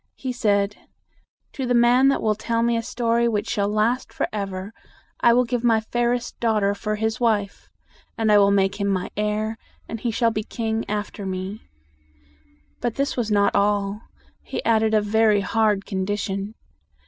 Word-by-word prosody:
He 260 -2 -4
said, 205 -3 +1 0.8
"To 265 -2 -3
the 245 - +2
man 240 +3 +5
that 275 - +1
will 215 - +3
tell 230 +2 -1
me 235 0 +2
a 230 - 0
story 235 0 0
which 215 -1 -1
shall 205 -2 0
last 215 +4 0
forever, 195 0 -4 0.5
I 235 - +5
will 245 +2 +4
give 245 0 -2
my 230 -2 +4
fairest 240 +2 -2
daugh 225 -2 +2
ter 200 0 +2
for 215 +1 -3
his 220 +1 -2
wife; 210 -4 -1 0.5
and 220 -2 +2
I 210 - +7
will 200 0 +5
make 200 +1 +1
him 200 - +1
my 190 -2 -1
heir, 210 +1 -2 0.3
and 225 - -5
he 235 - -2
shall 230 +1 +1
be 215 - -2
king 225 0 -3
after 210 -1 -4
me." 190 +2 -5 1.1
But 235 - -2
this 275 0 -1
was 235 -3 -1
not 205 -1 +3
all. 205 0 +1 0.4
He - - -6
added 220 -1 +3
a 215 - +4
very 210 0 +3
hard 210 0 +1
con 190 -2 -2
di 205 +1 -1
tion. 200 +1 -4
215 Hz, 185 wpm, -23 LUFS, 205-235 Hz, 1.1 s, I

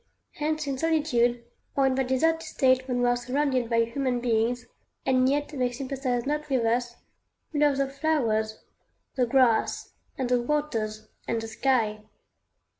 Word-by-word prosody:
Hence 310 0 -2
in 275 -2 -3
solitude, 255 -7 +1 0.3
or 275 - +3
in 265 - +3
that 265 -1 0
deserted 325 +6 +2
state 260 -5 +1
when 245 -1 0
we - - +3
are 245 - +3
surrounded 255 0 0
by 230 -1 +3
human 245 +1 -1
beings, 240 +1 0 0.4
and 255 0 +3
yet 290 +1 0
they 255 -4 -1
sympathize 255 -1 -2
not 300 +1 -2
with 255 -4 +1
us, 235 +1 0 0.6
we 295 - 0
love 290 -2 +3
the 275 0 +1
flowers, 240 -7 -1 0.5
the 250 -2 +1
grass, 245 -3 +2 0.2
and 260 - -1
the 245 0 +2
waters, 225 -6 -2 0.2
and 230 - 0
the 225 - -5
sky. 225 -3 +1
255 Hz, 160 wpm, -27 LUFS, 240-280 Hz, 0.6 s, or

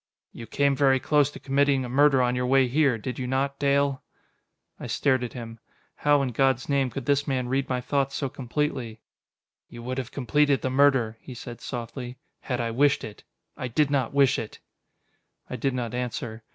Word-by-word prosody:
"You 115 - -10
came 140 -1 +1
very 135 -1 +3
close 145 +1 +2
to - - -11
committing 140 -1 +1
a - - -5
murder 135 +1 +4
on 125 0 +1
your 125 0 -1
way 135 0 +4
here, 135 -1 +2
did 125 +4 -6
you 125 - -3
not, 135 +2 -1
Dale?" 140 -1 +1 0.8
I - - -6
stared 130 -3 +1
at 120 - -5
him. 115 -2 -8 0.4
How, 145 -1 +3
in 130 - -1
God's 130 +1 +1
name, 140 -2 +1
could 125 +1 -6
this 145 +1 +1
man 130 -3 -1
read 135 +2 -1
my 125 -1 -1
thoughts 135 +1 -1
so 140 - -1
completely? 130 -3 -3 0.7
"You 120 0 -10
would 130 +2 -3
have 130 - -5
completed 145 +2 +1
the 130 - -1
murder," 130 -5 +3
he 130 - -10
said 120 0 -9
softly, 125 0 -6 0.2
"had 125 -2 -3
I 115 -1 -1
wished 140 +4 +2
it. 105 - -9 0.3
I 130 - -4
did 140 +4 +1
not 135 -5 +1
wish 140 -1 +3
it!" 110 - -7 0.9
I - - -3
did 130 +2 -1
not 120 -2 -3
answer. 120 -2 -4
130 Hz, 195 wpm, -26 LUFS, 125-140 Hz, 0.9 s, murder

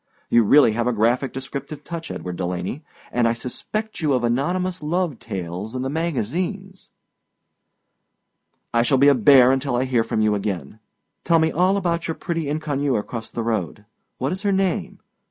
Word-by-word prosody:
You 120 - +6
really 125 +3 +6
have 120 +2 -1
a 125 - +2
graphic 120 +4 +1
descriptive 140 +2 -6
touch, 170 -1 -6
Edward 90 -1 -5
Delaney, 90 - -3 0.3
and 120 -1 +2
I 115 - +2
suspect 210 - -5
you 150 -3 +2
of 125 -2 +1
anonymous 175 +10 0
love 160 -3 -1
tales 95 +2 -5
in 130 - -2
the 135 - -2
magazines. 170 - -3 1.8
I 115 - +4
shall 120 +3 +2
be 140 +2 +6
a - - +6
bear 130 +1 +6
until 135 -1 0
I 125 - +1
hear 125 -3 +2
from 110 - -2
you 110 -1 +3
again. 105 0 -4 0.4
Tell 165 -1 +4
me 160 0 +2
all 185 +4 +2
about 170 -3 -1
your 165 - -2
pretty 165 -4 -3
inconnue 145 -3 -1
across 110 +2 -5
the 115 - -4
road. 105 -3 -2 0.3
What 135 - -1
is 190 +1 -3
her 205 -1 +1
name? 190 -2 -1
135 Hz, 175 wpm, -22 LUFS, 115-165 Hz, 1.8 s, You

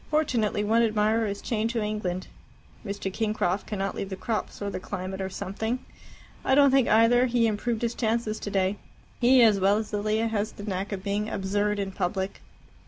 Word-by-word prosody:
Fortunately 240 -9 +1
one 225 +3 +3
admirer 220 0 +2
is 200 0 -5
chained 225 -1 0
to 230 -2 -1
England. 190 -4 -2 0.6
Mr. 200 -2 -4
Kingcroft 210 -4 -1
cannot 195 -2 -2
leave 195 - -4
the 190 - -4
crops 220 +3 -3
or 200 -1 -3
the - - -4
climate 190 0 -5
or 190 - -2
something. 200 +5 -3 0.7
I 265 - +3
don't 280 -1 +6
think, 270 -2 +4
either, 235 +3 +5
he 240 -1 +2
improved 225 +2 -1
his 235 0 0
chances 225 -2 -1
today. 195 0 0 0.4
He, 250 0 +6
as 215 -3 +5
well 195 +2 +4
as 215 -1 -4
Lilia, 215 +2 +1
has 215 -1 -2
the 205 - -9
knack 195 -1 -3
of 190 -2 -4
being 205 +1 -1
absurd 205 +2 0
in 195 -1 -2
public." 190 0 -2
210 Hz, 185 wpm, -27 LUFS, 195-230 Hz, 0.7 s, don't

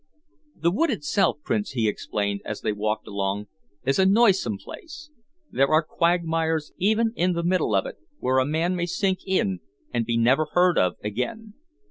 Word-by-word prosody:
"The 170 +1 +1
wood 330 - +1
itself, 200 - +1
Prince," 210 -6 -1
he 115 -4 +1
explained, 100 -1 -2
as 105 - -5
they - - 0
walked 105 +1 -2
along, 100 0 -2 0.4
"is 135 +5 +1
a 190 - +5
noisome 195 - +3
place. 300 - -11 0.4
There 135 - +3
are 155 +3 +3
quagmires 165 -2 0
even 220 +4 +2
in 180 -1 +1
the 170 0 -2
middle 175 - +1
of 95 - +2
it, - - -7 0.2
where 130 +1 +1
a 130 - +2
man 165 +4 0
may 175 -1 -1
sink 190 +1 0
in 190 0 +1 0.3
and 115 - +1
be 115 +1 -1
never 130 +7 +3
heard 180 -1 +4
of 90 -1 +2
again. 205 - -4
165 Hz, 175 wpm, -25 LUFS, 115-190 Hz, 0.4 s, a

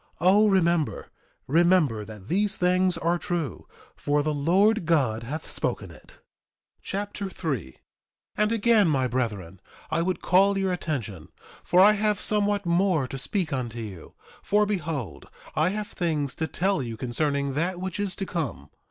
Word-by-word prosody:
O 195 +6 +5
remember, 175 -5 +1 0.3
remember 160 -7 +3
that 105 -2 -11
these 200 - 0
things 180 0 +2
are 170 +1 0
true; 170 -8 -4 0.3
for 145 0 0
the 155 0 0
Lord 180 +7 +2
God 130 -10 +2
hath 145 +7 -6
spoken - - -3
it. - - -16
Mosiah - - -42
Chapter 200 0 -4
3 135 - -4
3:1 - - -28 0.6
And 210 +1 +1
again 225 -3 +4
my 135 -5 +1
brethren, 105 -8 -3 0.3
I 160 +1 +1
would 180 0 -1
call 195 +2 +3
your 190 -1 0
attention, 115 - -4 0.4
for 180 +2 +4
I 205 +2 +8
have 210 -1 0
somewhat 205 -1 +1
more 170 -5 +2
to 135 - -6
speak 180 +2 -2
unto 120 -3 -3
you; 100 -7 -9 0.3
for 210 +1 +2
behold, 165 - -4 0.3
I 155 +4 +2
have 210 +1 -4
things 150 -6 -2
to 160 - -3
tell 190 0 0
you 115 -3 -5
concerning 140 +3 -1
that 175 +5 -1
which 190 +1 -4
is 200 -2 -2
to 195 - -4
come. 155 - -4
170 Hz, 160 wpm, -26 LUFS, 135-195 Hz, 0.6 s, I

